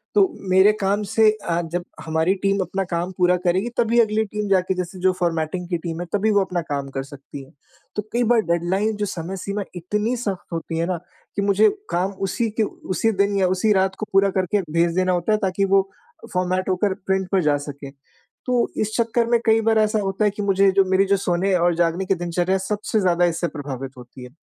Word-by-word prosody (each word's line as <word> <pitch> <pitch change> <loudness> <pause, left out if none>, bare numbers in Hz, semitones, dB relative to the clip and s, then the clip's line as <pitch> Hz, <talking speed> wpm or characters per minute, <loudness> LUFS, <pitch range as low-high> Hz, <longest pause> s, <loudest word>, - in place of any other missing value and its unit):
तो 400 -2 +6 0.2
मेरे 190 +3 +6
काम 200 +2 +1
से 215 +2 +4
अ, 175 -5 -2
जब 175 +1 -4 0.2
हमारी 160 +3 +1
टीम 200 0 +2
अपना 190 +2 -2
काम 175 0 -3
पूरा 180 -1 +4
करेगी 185 +6 +1
तभी 235 0 +3
अगली 220 -1 +2
टीम 210 0 -4
जाके 190 -1 +2
जैसे 180 +1 -5
जो 185 +1 +3
फ़ॉर्मेटिंग 170 0 -1
की 175 - 0
टीम 165 0 -5
है - - -4
तभी 210 +2 +2
वो 205 -1 +4
अपना 180 -2 -2
काम 140 -1 -2
कर 135 0 -4
सकती 140 0 -10
है। 135 - -18 0.4
तो 210 - 0
कई 240 +1 +2
बार 235 -2 +5
डेडलाइन 190 +6 0
जो 210 - -1
समय 185 0 -5
सीमा 200 +2 -3
इतनी 210 +7 -1
सख्त 200 -7 -4
होती 165 0 -4
है 165 - 0
ना 180 0 -1 0.4
कि 200 - 0
मुझे 200 +2 +4 0.2
काम 185 +3 0 0.2
उसी 230 +4 -1
के - - +5
उसी 210 +1 -1
दिन 200 0 +1
या 190 -1 +3
उसी 185 +4 +1
रात 190 0 +1
को 215 - -2
पूरा 195 +1 +5
करके 190 +2 +1
भेज 170 +1 +1
देना 185 0 +2
होता 175 +3 0
है - - +3
ताकि 190 +1 0
वो 195 0 +3 0.4
फ़ॉर्मेट 185 +1 0
होकर 190 +1 +1
प्रिंट 190 -1 0
पे 195 -2 +3
जा 150 -3 +2
सके। 140 -1 -8 0.5
तो 250 -2 +1
इस 215 0 -1
चक्कर 235 0 +1
में 235 -1 +4
कई 225 0 +4
बार 225 0 +2
ऐसा 215 0 +2
होता 195 +1 0
है 205 - +3
कि 205 - -6
मुझे 195 0 +3
जो 195 +1 +4
मेरी 190 +1 +4
जो 200 +1 +2
सोने 190 +1 0
और 175 -1 +2
जागने 170 +2 0
की 190 - +1
दिनचर्या 175 +2 0
सबसे 210 +3 -2
ज़्यादा 175 -2 +3
इससे 170 0 0
प्रभावित 135 -4 -6
होती 125 +1 -12
है। 125 - -9
190 Hz, 225 wpm, -22 LUFS, 175-205 Hz, 0.5 s, तो